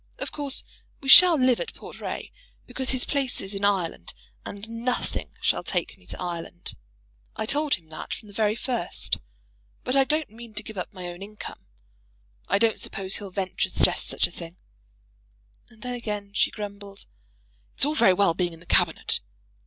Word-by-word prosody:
Of - - -4
course 285 -2 -1 0.4
we 270 - -4
shall 355 +3 +11
live 255 -1 +4
at 460 - -5
Portray, - - -6 0.3
because 260 -1 -4
his 260 -1 +3
place 275 -3 0
is 195 +1 0
in 200 0 -4
Ireland; 180 - 0 0.3
and 200 +2 -7
nothing 230 +2 -2
shall - - +2
take - - -1
me - - -24
to - - -6
Ireland. 175 0 -5 0.6
I - - -2
told 290 +5 +2
him 165 -3 -12
that 155 - -8
from 215 - -5
the 205 - -13
very 215 0 +2
first. 240 -6 -2 0.6
But 255 - +1
I 270 - +6
don't 305 0 0
mean 230 0 -11
to 210 - -2
give 220 - -8
up 180 - -4
my 185 -2 -8
own 175 +1 -9
income. 210 +1 -8 0.8
I - - +3
don't 225 +1 +2
suppose 195 -1 -2
he'll 205 -2 -7
venture 190 0 -1
to - - -10
suggest - - +3
such - - +2
a - - -4
thing." 170 +1 -9 1.1
And 220 -2 -16
then 250 0 -3
again 210 -4 -4
she - - +3
grumbled. 200 -1 -8 0.7
"It's - - +3
all 295 - +2
very 230 -10 +5
well 190 -2 +4
being 175 0 -1
in 165 - -12
the 175 - -16
Cabinet - - +4
210 Hz, 185 wpm, -26 LUFS, 190-250 Hz, 1.1 s, shall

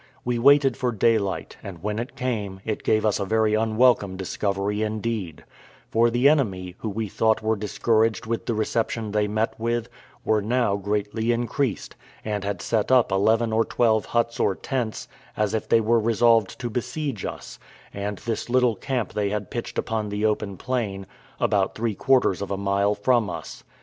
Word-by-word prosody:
We 120 -1 0
waited 140 0 +5
for 125 -1 -1
daylight, 110 -3 0
and 90 -4 -9
when 105 +1 -2
it 120 +5 -6
came, 105 -7 -3
it 110 -2 -2
gave 110 0 +1
us 105 -1 +1
a - - 0
very 110 +1 +1
unwelcome 110 -3 +2
discovery 100 +2 -2
indeed; 110 -6 -3 0.5
for 115 +1 +4
the 120 +3 +3
enemy, 95 - +1
who 110 - -3
we 110 +2 -3
thought 110 +2 +1
were 110 0 +2
discouraged 110 +2 +1
with 115 +1 -3
the 115 - 0
reception 110 0 -1
they 105 0 +1
met 110 +2 0
with, 115 0 -1 0.4
were 110 -1 +2
now 115 -1 +1
greatly 105 +3 -1
increased, 120 0 -2 0.3
and 105 -2 -2
had 100 0 -3
set 110 +1 0
up 125 -5 +4
eleven 110 +4 +2
or 115 +1 +3
twelve 110 -2 +1
huts 115 0 -1
or 95 - +2
tents, 120 -3 -3 0.3
as 105 -1 0
if 110 - -2
they 115 - +5
were 115 +1 +3
resolved 115 -2 +3
to 120 -2 -4
besiege 125 0 -3
us; - - -7 0.3
and 100 0 -4
this 115 +3 -4
little 125 -2 +3
camp 125 +1 -3
they 105 -1 0
had 105 -1 -4
pitched 120 0 -5
upon 110 -2 -2
the 105 +1 -1
open 105 -2 -1
plain, 105 -6 -3 0.3
about 100 -3 +1
three 115 -1 -1
quarters 125 -5 +2
of 100 - -4
a 100 - -2
mile 100 +1 +1
from 115 +1 +2
us. - - -7
110 Hz, 180 wpm, -24 LUFS, 100-120 Hz, 0.5 s, waited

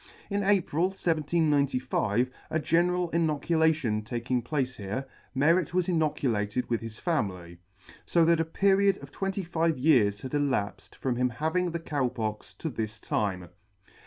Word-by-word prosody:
In 200 0 +1
April, 190 -4 +2
1795, 145 - +1 0.2
a - - 0
general 175 +2 +1
inoculation 160 -6 +1
taking 120 +3 -2
place 130 0 -2
here, 105 +7 -4 0.3
Merret 165 +5 +2
was 185 -2 +2
inoculated 125 - 0
with 115 - +1
his 115 -1 -7
family; 95 - -2 0.5
fo 170 -2 +4
that 165 0 +4
a - - +3
period 195 +3 +3
of - - -10
twenty 195 0 -2
five 165 -2 0
years 120 -8 +3
had 130 - -7
elapfed 135 -8 -1
from 125 -2 -2
his 125 0 +2
having 160 +7 0
the 170 0 -3
Cow 145 -5 -1
Pox 110 -3 -4
to 160 - -4
this 110 -3 -4
time. 95 -4 -2
145 Hz, 145 wpm, -28 LUFS, 120-170 Hz, 0.5 s, fo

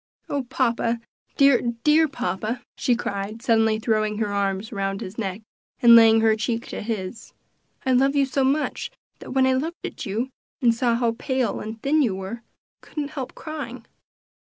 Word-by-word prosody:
"Oh, 280 -2 -1
papa! 235 -2 0 0.4
dear, 275 -3 +6 0.2
dear 310 +1 +5
papa!" 240 -3 -3
she 245 - +1
cried, 210 0 -4
suddenly 225 -3 +3
throwing 215 -1 0
her 210 -2 -1
arms 200 +1 -1
round 195 -1 -2
his 185 - -7
neck, 200 0 -3 0.4
and 235 -1 +8
laying 225 -1 +7
her 220 -1 +4
cheek 230 +1 -2
to - - -5
his; 210 -1 -5 0.5
"I 260 - +2
love 270 +3 +3
you 280 -1 +4
so 270 +1 0
much, 290 - 0 0.3
that - - -8
when 265 -1 +4
I 260 - +3
looked 315 +6 -3
at - - -6
you, 230 +7 -2 0.3
and 240 -4 +4
saw 235 0 +1
how 230 -1 0
pale 260 -5 -1
and 220 +1 -6
thin 300 +3 +3
you 225 -9 +1
were, 190 +4 -5
I - - -28
couldn't 295 -2 -4
help 270 -5 -6
crying." 255 -7 -7
235 Hz, 180 wpm, -24 LUFS, 215-265 Hz, 0.5 s, and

